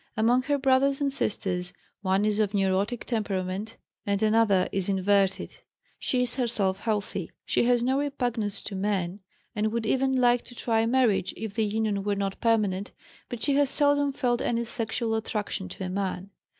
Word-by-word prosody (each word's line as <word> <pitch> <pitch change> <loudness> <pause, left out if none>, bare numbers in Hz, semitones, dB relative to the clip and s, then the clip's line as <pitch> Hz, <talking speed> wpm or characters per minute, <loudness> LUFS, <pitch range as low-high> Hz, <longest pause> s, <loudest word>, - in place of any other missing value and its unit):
Among 235 +3 +3
her 285 +2 0
brothers 270 0 +3
and 280 -2 0
sisters, 180 -7 -1 0.3
one 195 +1 +1
is 210 0 +1
of 210 -1 +1
neurotic 195 +4 0
temperament 205 -1 -3 0.3
and 200 0 0
another 215 -4 +3
is 195 0 -1
inverted. 195 0 +1 0.4
She 250 -1 +1
is 250 +1 -1
herself 210 -6 +1
healthy. 210 -3 -2 0.2
She - - +1
has 240 -1 +3
no 260 +2 +2
repugnance 245 -8 -2
to 200 - -6
men, 190 -1 -1 0.4
and 215 0 0
would 230 0 -2
even 265 +3 +1
like 245 -1 +4
to 245 - -12
try 225 -1 +1
marriage, 235 -7 +2
if 220 -2 -5
the 220 0 +1
union 210 -1 -1
were 205 0 0
not 195 -1 -3
permanent, 205 -4 +1 0.4
but 235 -3 -5
she 280 - +2
has 285 -2 +3
seldom 285 -1 +3
felt 245 -3 0
any 235 0 0
sexual 230 0 -2
attraction 210 -3 -3
to 190 - -7
a - - -3
man. 190 0 -3
220 Hz, 175 wpm, -27 LUFS, 200-245 Hz, 0.4 s, like